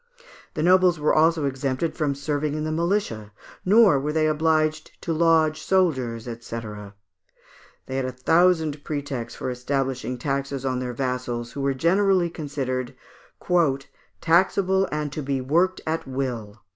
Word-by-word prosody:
The 155 - -1
nobles 180 -1 +4
were 150 - +2
also 160 -1 +3
exempted 135 +3 -2
from 145 -4 0
serving 145 +1 -2
in 155 - -2
the 155 - -2
militia, 165 - -1 0.3
nor 200 -7 +5
were 145 +3 -2
they 155 0 +1
obliged 155 0 0
to 165 - -2
lodge 160 -1 +3
soldiers, 130 -13 +1
&c. 115 -1 -6 1.3
They 130 - -6
had 135 - -1
a 130 - -3
thousand 160 +2 +2
pretexts 140 -6 -4
for 130 - -3
establishing 130 0 -2
taxes 140 0 -3
on 130 -1 0
their 125 -1 -4
vassals, 125 -2 -3
who 140 - -5
were 135 0 0
generally 180 +3 +2
considered 135 -5 -4 1.2
"taxable 190 +3 +2
and 150 -1 -2
to 155 - -3
be 135 -1 -1
worked 170 +8 +1
at 160 -2 -2
will." 120 -6 -4
145 Hz, 145 wpm, -24 LUFS, 130-165 Hz, 1.3 s, nor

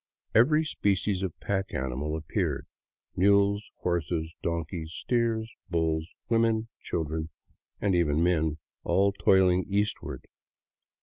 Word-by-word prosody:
Every 150 +7 +5
species 100 - 0
of 95 -4 -4
pack 100 -1 -2
animal 65 +4 -2
ap 80 - -9
peared,— - - -1 0.5
mules, 100 +2 +3
horses, 85 -2 -1
donkeys, 85 -1 -3
steers, 115 -1 0 0.2
bulls, 80 -1 0 0.2
women, 115 -1 +2
children, 80 -1 -3 0.5
and 100 -2 +1
even 80 -2 +2
men, 80 -3 +2 0.3
all 100 +1 +3
toiling 95 -2 +3
eastward. 100 +1 -1
90 Hz, 110 wpm, -28 LUFS, 80-100 Hz, 0.5 s, Every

